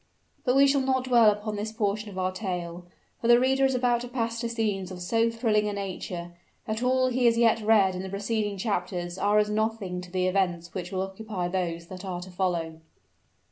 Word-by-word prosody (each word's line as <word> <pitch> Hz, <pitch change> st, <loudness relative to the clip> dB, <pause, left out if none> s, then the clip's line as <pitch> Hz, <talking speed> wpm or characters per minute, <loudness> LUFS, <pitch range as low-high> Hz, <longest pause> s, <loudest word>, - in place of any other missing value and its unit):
But 250 Hz, 0 st, +2 dB
we 275 Hz, +1 st, +7 dB
shall 280 Hz, 0 st, +3 dB
not 260 Hz, -1 st, +1 dB
dwell 240 Hz, -4 st, +6 dB
upon 210 Hz, +1 st, -2 dB
this 215 Hz, +1 st, -3 dB
portion 210 Hz, -1 st, -1 dB
of 190 Hz, -, -10 dB
our 185 Hz, 0 st, 0 dB
tale; 180 Hz, -3 st, -5 dB, 0.3 s
for 230 Hz, -, -2 dB
the 240 Hz, 0 st, +7 dB
reader 265 Hz, +1 st, +3 dB
is 265 Hz, -1 st, +2 dB
about 245 Hz, -1 st, +2 dB
to 245 Hz, -, -5 dB
pass 230 Hz, -2 st, -2 dB
to 235 Hz, 0 st, -2 dB
scenes 210 Hz, -5 st, -1 dB
of 185 Hz, -1 st, -8 dB
so 225 Hz, +6 st, +1 dB
thrilling 220 Hz, -2 st, +1 dB
a -, -, -3 dB
nature, 185 Hz, -3 st, -5 dB, 0.3 s
that 220 Hz, +1 st, -3 dB
all 255 Hz, +1 st, +2 dB
he 250 Hz, 0 st, +1 dB
has 230 Hz, -1 st, +4 dB
yet 230 Hz, -1 st, +4 dB
read 210 Hz, -3 st, +4 dB
in 185 Hz, -, -4 dB
the 190 Hz, -, -6 dB
preceding 205 Hz, +1 st, -2 dB
chapters 185 Hz, -3 st, -2 dB
are 205 Hz, +1 st, +3 dB
as 210 Hz, 0 st, +2 dB
nothing 215 Hz, -4 st, -1 dB
to 180 Hz, -, -10 dB
the 185 Hz, 0 st, 0 dB
events 180 Hz, -2 st, 0 dB
which 180 Hz, -2 st, -5 dB
will 190 Hz, -1 st, -1 dB
occupy 195 Hz, -1 st, -4 dB
those 175 Hz, -2 st, -2 dB
that 185 Hz, +2 st, -9 dB
are 185 Hz, -2 st, -4 dB
to 185 Hz, +1 st, -9 dB
follow. 170 Hz, -3 st, -2 dB
205 Hz, 215 wpm, -27 LUFS, 185-230 Hz, 0.3 s, we